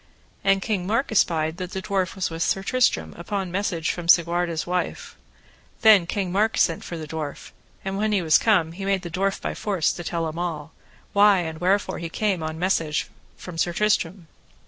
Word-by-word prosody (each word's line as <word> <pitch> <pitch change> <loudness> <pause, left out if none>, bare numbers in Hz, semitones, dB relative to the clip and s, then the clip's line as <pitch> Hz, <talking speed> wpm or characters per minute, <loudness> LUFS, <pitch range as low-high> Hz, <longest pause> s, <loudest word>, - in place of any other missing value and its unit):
And 195 -1 +3
King 195 -6 -1
Mark 230 +6 0
espied 160 -5 +1
that 185 -1 -6
the 190 - -3
dwarf 195 -4 -1
was 190 -3 -2
with 165 0 -5
Sir 195 +2 +1
Tristram 195 - +1
upon 190 0 -3
message 180 -4 -1
from 175 -1 -6
Segwarides' 170 -1 +3
wife; 180 0 -3 0.7
then 210 -6 +6
King 190 -1 -2
Mark 215 +4 +1
sent 165 - +2
for 170 - -6
the 155 -1 -7
dwarf, 150 -2 -6 0.3
and 195 +1 -2
when 215 0 +1
he 200 -4 +1
was 160 -1 +5
come 185 -8 +2
he 190 +4 -8
made 195 -1 0
the 175 - -6
dwarf 195 +3 0
by - - -3
force 190 -7 0
to 175 - -7
tell 165 -1 -2
him 160 +2 -5
all, 155 -4 -4 0.4
why 200 -2 +5
and 160 -1 -6
wherefore 195 +3 +1
that - - -7
he - - -4
came 195 -1 -1
on 160 0 -4
message 165 -4 0 0.3
from 175 -3 -8
Sir 175 +1 +1
Tristram. 190 -3 0
180 Hz, 200 wpm, -24 LUFS, 165-195 Hz, 0.7 s, then